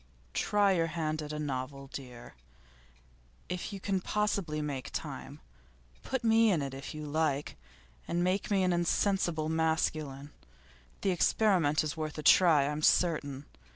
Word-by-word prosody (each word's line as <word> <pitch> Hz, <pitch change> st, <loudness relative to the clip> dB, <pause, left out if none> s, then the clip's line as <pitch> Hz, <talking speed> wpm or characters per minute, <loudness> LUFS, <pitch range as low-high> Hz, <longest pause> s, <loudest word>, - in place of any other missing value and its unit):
'Try 205 Hz, -1 st, +2 dB
your 165 Hz, -3 st, +2 dB
hand 155 Hz, -1 st, -2 dB
at 150 Hz, 0 st, -6 dB
a 150 Hz, -, -4 dB
novel, 135 Hz, -1 st, -4 dB
dear, 125 Hz, -3 st, -9 dB, 1.2 s
if 180 Hz, +3 st, -4 dB
you 200 Hz, -, -6 dB
can 190 Hz, -1 st, -1 dB
possibly 200 Hz, -7 st, -1 dB
make 145 Hz, -3 st, -4 dB
time. -, -, -6 dB, 0.6 s
Put 265 Hz, -2 st, -3 dB
me 225 Hz, 0 st, +5 dB
in 160 Hz, -6 st, +1 dB
it, 135 Hz, -1 st, -5 dB
if 135 Hz, +3 st, -7 dB
you 155 Hz, 0 st, -6 dB
like, 150 Hz, -1 st, -1 dB, 0.5 s
and 175 Hz, +1 st, 0 dB
make 185 Hz, +2 st, 0 dB
me 195 Hz, -2 st, +2 dB
an 180 Hz, -1 st, +2 dB
insensible 175 Hz, -2 st, +1 dB
masculine. 155 Hz, -3 st, -1 dB, 0.7 s
The 195 Hz, -, +1 dB
experiment 175 Hz, -5 st, +2 dB
is 155 Hz, -, -3 dB
worth 155 Hz, -1 st, -4 dB
a 150 Hz, -, -5 dB
try 165 Hz, -5 st, +6 dB
I'm 150 Hz, +1 st, -2 dB
certain. 150 Hz, -5 st, +2 dB
160 Hz, 150 wpm, -31 LUFS, 145-185 Hz, 1.2 s, try